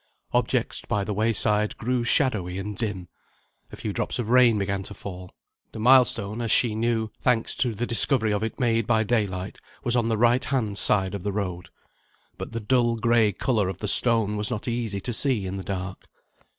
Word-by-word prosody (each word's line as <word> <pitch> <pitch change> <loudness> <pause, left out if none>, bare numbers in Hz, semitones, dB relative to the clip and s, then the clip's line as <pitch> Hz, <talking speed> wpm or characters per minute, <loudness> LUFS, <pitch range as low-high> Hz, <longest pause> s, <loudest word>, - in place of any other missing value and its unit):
Objects - - 0
by 100 - -1
the 105 - -3
wayside 105 0 +1
grew 125 +1 -1
shadowy 110 - +1
and 100 +2 -5
dim. 95 -5 -4 0.6
A - - -8
few - - -5
drops - - -2
of 115 -3 -4
rain 125 -3 +5
began 100 -1 -2
to 100 +2 -10
fall. 90 -2 -9 0.4
The - - -7
milestone, 120 -3 +3
as 115 - -3
she 115 -1 +3
knew 110 0 -1
thanks 120 -3 +1
to 125 -3 0
the 120 +4 -2
discovery 115 -2 +1
of 105 - -1
it 110 0 -4
made 115 -3 +1
by 110 -2 +2
daylight 100 -4 -2 0.2
was 120 -2 +2
on 115 -2 +1
the 110 - 0
right 120 +3 +3
hand 110 -7 -1
side 95 -2 +4
of 100 - -5
the 100 - -3
road. 90 -3 -4 0.7
But - - -6
the 115 - -4
dull 120 +1 +1
grey 115 -1 +2
colour 105 -1 -1
of 95 - -6
the 105 - -5
stone 110 -1 +4
was 105 0 0
not 115 -1 -5
easy 115 -4 -3
to 120 - -4
see 115 -4 +1
in 95 +1 -5
the 95 - -6
dark. 95 -1 -6
110 Hz, 200 wpm, -24 LUFS, 100-120 Hz, 0.7 s, rain